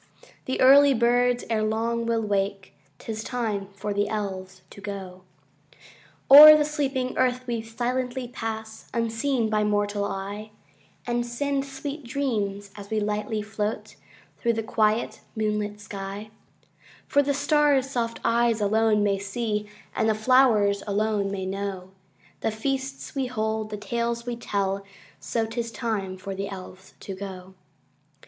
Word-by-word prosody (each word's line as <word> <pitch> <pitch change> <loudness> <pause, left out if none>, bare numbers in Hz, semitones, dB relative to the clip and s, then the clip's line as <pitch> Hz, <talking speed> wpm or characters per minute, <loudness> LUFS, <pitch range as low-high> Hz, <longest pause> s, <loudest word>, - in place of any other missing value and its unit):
The 260 - -2
early 275 +1 +7
birds 245 +1 +2
erelong 225 +1 0
will 230 -1 +1
wake: 195 -3 -2 0.2
âT - - -14
is 220 0 -3
time 220 -6 -2
for 205 +1 -3
the 205 +1 0
Elves 190 -3 -5
to 200 - -12
go. 190 -2 -7 1.1
Oâer 305 +2 +12
the 300 - +2
sleeping 275 -4 -2
earth 255 0 +1
we 235 -2 -2
silently 245 +3 -3
pass, 220 -2 -6
Unseen 230 +2 0
by 215 -1 +1
mortal 205 -1 0
eye, 200 +2 -5 0.6
And 240 0 0
send 275 +3 -2
sweet 280 +2 -6
dreams, 210 -6 -2
as 200 -1 -10
we 220 - 0
lightly 210 +1 -2
float 210 0 -4 0.4
Through 235 -1 +1
the 225 0 -2
quiet 215 0 0
moonlit 210 -1 -1
sky;â 200 +1 -7 0.8
For 285 - +4
the 285 0 0
starsâ 290 -1 +3
soft 240 -4 -3
eyes 235 -1 +3
alone 215 0 +3
may 200 -1 +1
see, 210 +1 -3 0.3
And 220 - +2
the 215 - +2
flowers 220 -4 +4
alone 205 0 0
may 190 -1 -3
know, 190 -1 -4 0.5
The - - 0
feasts 265 +4 -3
we 270 -2 -1
hold, 220 -2 -2
the 210 - -5
tales 235 +2 -2
we 245 -1 -3
tell: 200 -4 -2 0.4
So 230 -1 -1
ât 225 +1 -9
is 230 -1 -3
time 210 -4 -3
for 195 +1 -6
the 195 +1 -4
Elves 190 0 -10
to 195 - -6
go. 190 -1 -8
220 Hz, 145 wpm, -25 LUFS, 205-245 Hz, 1.1 s, Oâer